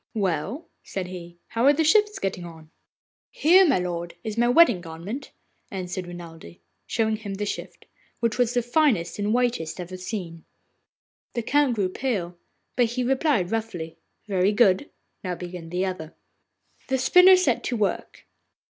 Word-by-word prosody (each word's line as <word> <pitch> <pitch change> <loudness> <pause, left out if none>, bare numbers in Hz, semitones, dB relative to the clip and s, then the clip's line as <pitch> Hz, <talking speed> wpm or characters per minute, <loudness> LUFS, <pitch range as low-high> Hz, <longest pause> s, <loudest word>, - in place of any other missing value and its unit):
'Well,' 200 - -2
said 190 -2 -5
he, 175 -1 -9
'how 230 +2 0
are 285 - +7
the 320 +2 +1
shifts 420 +7 +3
getting 190 -2 -3
on?' 160 -2 -12 0.6
'Here, 365 +4 +5
my 280 - +4
lord, 175 -1 -4
is 215 -1 -4
my 240 +1 +2
wedding 245 - +5
garment,' 175 - -7 0.4
answered 185 -1 -5
Renelde, 165 - -10 0.3
showing 220 -2 0
him 205 -3 -6
the 205 +1 -3
shift, - - -6 0.3
which 230 -1 -1
was 245 -1 +2
the 245 - +2
finest 240 - +1
and 205 +1 0
whitest 235 -10 0
ever 180 +1 -6
seen. 180 -4 -6 0.9
The 235 - -1
Count 285 0 +2
grew 200 -4 +1
pale, 185 -6 -2 0.4
but 245 - +4
he 245 +2 -2
replied 260 - +1
roughly, 205 -8 -4 0.3
'Very 195 0 +2
good. 205 +3 +3 0.3
Now 180 -2 -2
begin 175 -2 -8
the 180 +2 -1
other.' 175 -4 -5 0.7
The 265 - +1
spinner 360 +8 +7
set 370 0 +1
to 245 - -1
work. 205 -2 -2
205 Hz, 155 wpm, -25 LUFS, 175-245 Hz, 0.9 s, are